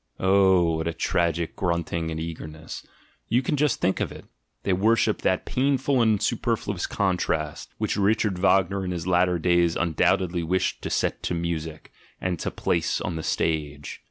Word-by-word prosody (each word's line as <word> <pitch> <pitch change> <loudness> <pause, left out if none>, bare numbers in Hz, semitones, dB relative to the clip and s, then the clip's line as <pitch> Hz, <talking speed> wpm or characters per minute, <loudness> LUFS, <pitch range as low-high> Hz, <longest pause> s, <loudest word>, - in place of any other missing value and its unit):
Oh, 95 -3 +4
what 80 +1 -2
a 85 - -1
tragic 85 -1 0
grunting 85 -2 -1
and 80 0 -4
eager 80 -1 -5
ness! 80 +1 -9 0.4
You 120 +4 +2
can 140 - 0
just 145 -3 +1
think 95 - +1
of - - -1
it - - -11 0.2
— - - -49
they 95 - +1
worship 110 +5 +2
that - - +1
pain 135 +2 +1
ful 135 0 +1
and 110 -3 +3
superfluous - - -1
contrast, 90 -6 -1
which - - -1
Richard 105 -2 +1
Wagner 95 0 +2
in 90 - -3
his 85 -2 -3
latter 90 0 +3
days 85 0 +2
undoubtedly 85 +1 +1
wished 90 +3 -1
to - - -4
set - - -1
to 90 - -2
music, 80 -2 -4 0.3
and 90 -3 -2
to - - -2
place 85 -2 0
on 85 - -3
the 80 - -3
stage! 75 -3 -2
90 Hz, 180 wpm, -25 LUFS, 80-95 Hz, 0.4 s, Oh